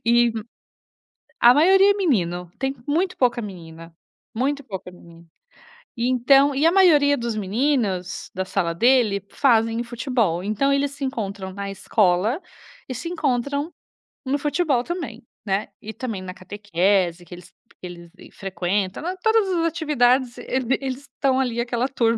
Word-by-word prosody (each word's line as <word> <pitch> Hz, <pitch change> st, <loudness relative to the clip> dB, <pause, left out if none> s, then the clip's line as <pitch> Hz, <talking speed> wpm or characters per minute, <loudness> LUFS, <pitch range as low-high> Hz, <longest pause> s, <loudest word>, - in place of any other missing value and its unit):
e 235 Hz, 0 st, +4 dB, 1.1 s
a 240 Hz, +1 st, +7 dB
maioria 385 Hz, +6 st, +5 dB
é -, -, -8 dB
menino, 180 Hz, -, -1 dB
tem 270 Hz, 0 st, -1 dB
muito 350 Hz, +6 st, 0 dB
pouca 245 Hz, -2 st, +1 dB
menina, 165 Hz, -4 st, -10 dB, 0.4 s
muito 280 Hz, +4 st, -1 dB
pouca 190 Hz, -6 st, -7 dB
menina 170 Hz, -1 st, -17 dB, 0.7 s
e 235 Hz, +1 st, 0 dB
então 270 Hz, +3 st, +4 dB
e 290 Hz, -, +2 dB
a 330 Hz, -, +6 dB
maioria 300 Hz, -7 st, +5 dB
dos 235 Hz, -2 st, -3 dB
meninos, 210 Hz, -3 st, -1 dB
da 190 Hz, +1 st, -3 dB
sala 175 Hz, -3 st, -1 dB
dele, 230 Hz, -1 st, +3 dB
fazem 230 Hz, -3 st, +2 dB
futebol, 235 Hz, -, -1 dB
então 215 Hz, +7 st, 0 dB
eles 280 Hz, 0 st, 0 dB
se 280 Hz, 0 st, -8 dB
encontram 200 Hz, -7 st, -4 dB
na 200 Hz, 0 st, -5 dB
escola 195 Hz, -, +1 dB, 0.5 s
e 255 Hz, -, -5 dB
se 255 Hz, +8 st, -5 dB
encontram 285 Hz, -1 st, -1 dB, 0.5 s
no 275 Hz, +2 st, 0 dB
futebol 290 Hz, -3 st, 0 dB
também, 265 Hz, -8 st, -6 dB, 0.2 s
né, 195 Hz, 0 st, -1 dB
e 220 Hz, +1 st, -7 dB
também 225 Hz, -4 st, -5 dB
na 185 Hz, -1 st, -7 dB
catequese 185 Hz, -2 st, -1 dB
que 175 Hz, -, -10 dB
eles 175 Hz, +1 st, -15 dB, 0.3 s
que 180 Hz, -, -6 dB
eles 170 Hz, -1 st, -11 dB, 0.2 s
frequentam 190 Hz, -, -2 dB
na 365 Hz, +3 st, -3 dB
todas 445 Hz, +2 st, +2 dB
as 335 Hz, -2 st, 0 dB
atividades 265 Hz, -6 st, +1 dB
ele 260 Hz, -1 st, -3 dB
vi 260 Hz, +3 st, +1 dB
eles 265 Hz, 0 st, -4 dB
estão 265 Hz, -1 st, -1 dB
ali 245 Hz, -3 st, -1 dB
aquela 240 Hz, +2 st, -1 dB
turma. 230 Hz, -3 st, +1 dB
240 Hz, 155 wpm, -22 LUFS, 195-280 Hz, 1.1 s, a